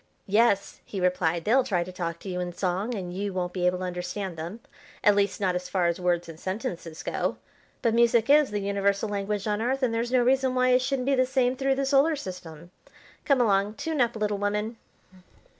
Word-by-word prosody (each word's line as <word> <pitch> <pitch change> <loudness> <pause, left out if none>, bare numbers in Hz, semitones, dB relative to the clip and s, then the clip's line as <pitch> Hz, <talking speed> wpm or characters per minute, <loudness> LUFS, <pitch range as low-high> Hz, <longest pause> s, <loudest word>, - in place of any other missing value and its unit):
"Yes," 205 -1 +2
he 195 - -6
replied; 175 -2 0
"they'll 255 +5 +4
try 180 -7 0
to 185 - -9
talk 170 -2 -4
to 195 - -7
you 180 -1 -3
in 175 -1 -3
song, 190 +6 -1
and 180 -3 -5
you 200 +1 -3
won't 180 -1 -2
be 180 -1 +1
able 180 0 +1
to 185 - -5
understand 180 +1 -4
them; 170 +7 -6 0.4
at 205 - +6
least, 200 -2 +1
not 190 -3 +1
as 180 0 -4
far 185 -2 +1
as 170 0 0
words 175 -1 0
and 165 -1 -10
sentences 185 -5 -5
go. - - -2 0.5
But 230 - +2
music 235 -1 +4
is 290 0 +5
the 205 0 -2
universal 200 +1 0
language 205 0 -2
on 210 0 -1
Earth, 260 +3 -1
and 240 -3 +2
there's 235 +1 -1
no 255 -1 +4
reason 260 +1 +2
why 255 0 +3
it 250 0 +4
shouldn't 260 -1 -1
be 275 - +2
the 255 -1 +3
same 260 -1 +1
through 270 0 +1
the 275 0 -1
Solar 280 +3 +3
System. 175 - -9 0.5
Come 275 -3 +3
along, 205 -1 +2
tune 315 +3 -2
up, 235 -1 +1
little 210 -2 -1
woman!" 210 +3 -2
205 Hz, 220 wpm, -26 LUFS, 180-245 Hz, 0.5 s, at